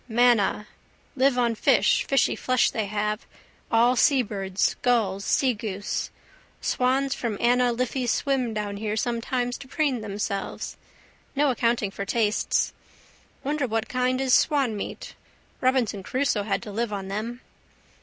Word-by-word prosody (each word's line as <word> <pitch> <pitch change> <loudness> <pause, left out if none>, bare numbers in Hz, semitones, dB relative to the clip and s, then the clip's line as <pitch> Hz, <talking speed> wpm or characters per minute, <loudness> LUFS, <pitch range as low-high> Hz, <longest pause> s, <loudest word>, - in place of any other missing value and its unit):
Manna. 230 -3 +3 0.5
Live 265 -1 +3
on 240 -2 +2
fish, 220 - +3
fishy 275 -2 +2
flesh 255 -1 +2
they 220 -3 -2
have, 210 +1 -2 0.4
all 235 +2 +4
seabirds, 205 -8 +1
gulls, 215 -6 +1
seagoose. 210 -6 -1 0.5
Swans 265 +2 +1
from 225 -4 -3
Anna 245 +1 +3
Liffey 250 +1 -1
swim 255 0 0
down 210 -2 -3
here 215 +1 -2
sometimes 245 +2 -1
to 270 - -10
preen 270 -4 0
themselves. 200 -1 -4 0.6
No 285 0 +3
accounting 230 -4 0
for 200 - -5
tastes. 215 +1 +1 0.7
Wonder 290 -1 -1
what 225 -1 -1
kind 255 0 0
is 265 -2 +1
swanmeat. 255 -9 +1 0.5
Robinson 255 -6 +1
Crusoe 250 +1 0
had 195 -2 -1
to 210 - -7
live 230 +2 -2
on 195 -2 -4
them. 225 +5 -4
235 Hz, 130 wpm, -25 LUFS, 210-255 Hz, 0.7 s, all